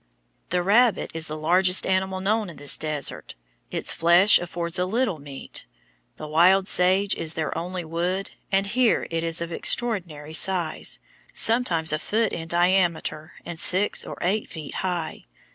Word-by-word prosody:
"The 180 0 0
rabbit 225 +4 +3
is 160 -1 -2
the 155 - -6
largest 180 +4 +4
animal 190 0 -1
known 210 +1 0
in 170 - -10
this 145 0 +3
desert, 150 -3 -3 0.3
its - - 0
flesh 175 +5 +5
affords 175 0 -3
a 180 - 0
little 220 -5 -1
meat.... 140 -1 -9 0.5
The 155 - -8
wild 185 +5 +4
sage 190 +2 +3
is 160 -1 -2
their 160 -1 -3
only 180 0 -5
wood, 175 +4 -3 0.2
and 195 0 +2
here 235 +3 +1
it 165 0 -2
is 165 0 -1
of 170 0 -4
extraordinary 170 -8 -2
size 175 -1 +1 0.4
sometimes 175 -10 +1
a 155 - 0
foot 220 +4 -1
in 165 -1 -5
diameter 175 -2 0
and 170 -2 -6
six 185 +5 +2
or - - -8
eight 200 +5 -1
feet 155 -3 -8
high. 175 - -4
175 Hz, 160 wpm, -24 LUFS, 160-190 Hz, 0.5 s, flesh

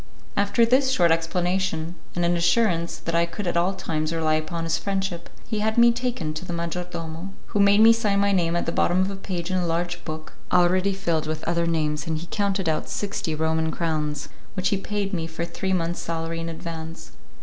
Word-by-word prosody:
After 200 +3 +3
this 260 +3 +3
short 175 -10 +4
explanation, 170 0 0 0.2
and 175 0 +1
an 175 0 +3
assurance 170 -1 +2
that 165 - -4
I 170 0 +3
could 170 +4 -5
at 175 - -1
all 180 +3 +2
times 155 -2 -2
rely 160 -1 +1
upon 160 +2 -1
his 165 0 0
friendship, 195 -3 -2 0.2
he 220 -2 -1
had 220 +1 0
me 235 0 +7
taken 235 -10 -2
to 155 - -5
the 180 - -6
major 170 +1 -2
domo, 165 +1 -5 0.2
who 205 - -1
made 200 +1 +6
me 225 +1 +9
sign 210 -3 +1
my 200 0 +3
name 170 -3 +2
at 175 - 0
the - - -1
bottom 175 +2 +2
of 190 +1 0
a - - -4
page 185 -2 -4
in 185 - +1
a 180 -1 0
large 175 +1 -1
book, 155 -1 -7 0.2
already 185 +2 +4
filled 165 -5 0
with 155 0 -3
other 170 0 0
names, 155 -1 0
and 160 +1 -3
counted 200 -3 0
out 155 -1 0
sixty 200 -6 -2
Roman 160 +1 +1
crowns 155 -3 -2 0.3
which 185 -1 +1
he 200 - +1
paid 200 0 -3
me 165 -3 -1
for 165 +1 -4
three 180 +3 -3
months 175 -2 0
salary 165 0 -3
in 165 0 -3
advance. 165 -1 -7
170 Hz, 215 wpm, -25 LUFS, 165-195 Hz, 0.3 s, me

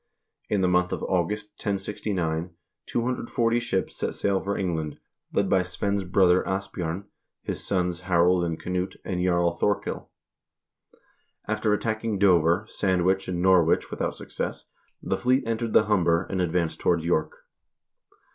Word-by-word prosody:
In 105 -2 +1
the 90 - +3
month 90 0 +2
of - - -3
August, 100 +4 -1
1069, 95 -5 -2 0.3
240 120 -1 0
ships 95 -5 -2
set - - -3
sail 100 -1 +1
for 100 +1 -2
England, 80 -6 -2 0.3
led - - +1
by 95 - +3
Svein's 100 +2 -2
brother 90 0 +4
Asbj0rn, 95 -2 -3 0.4
his - - -4
sons 90 -3 -1
Harald 90 0 +3
and 85 -2 -2
Knut, 90 +1 -2
and 90 -1 -1
Jarl 85 -1 +2
Thorkil. 100 +4 -1 1.4
After 110 0 0
attacking 110 0 -1
Dover, 90 0 +4
Sand 95 -5 0
wich, 95 +1 +1
and 90 -1 -2
Norwich 90 -3 +4
without - - -2
success, - - -5 0.4
the - - 0
fleet 130 +2 +2
entered 115 0 -2
the - - +6
Humber, 90 -5 +2
and 95 -1 0
advanced 85 -1 0
toward 85 -2 +2
York. 80 -2 0
95 Hz, 140 wpm, -26 LUFS, 85-100 Hz, 1.4 s, the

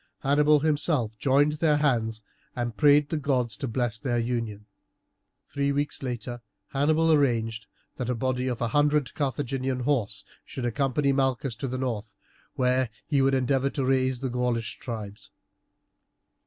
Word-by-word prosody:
Hannibal 150 +2 +4
himself 145 -7 +1
joined 140 +2 +3
their 155 -3 +3
hands 115 -7 0 0.3
and 120 -2 -3
prayed 145 +1 +5
the 160 - -1
gods 130 -6 0
to 135 - -3
bless 115 -1 -1
their 125 -4 -1
union. 115 -3 -2 0.8
Three 140 0 -1
weeks 145 +1 -1
later 120 -2 -4 0.3
Hannibal 155 +4 +2
arranged 115 -6 +1 0.3
that 125 -2 -3
a 125 - 0
body 130 +1 -1
of 125 -2 -2
a 120 - 0
hundred 145 +1 +2
Carthaginian 135 -2 -2
horse 125 -5 0 0.2
should 125 - -6
accompany 140 +3 +1
Malchus 135 -2 0
to 135 - -3
the 130 +1 -3
north, 115 -5 -3 0.4
where 125 -1 +2 0.2
he 140 -3 +2
would 135 0 +3
endeavour 135 +1 +1
to 135 -2 -2
raise 130 -1 +1
the 130 -2 -2
Gaulish 120 -2 -1
tribes. 105 -4 -7
130 Hz, 150 wpm, -27 LUFS, 120-140 Hz, 0.8 s, prayed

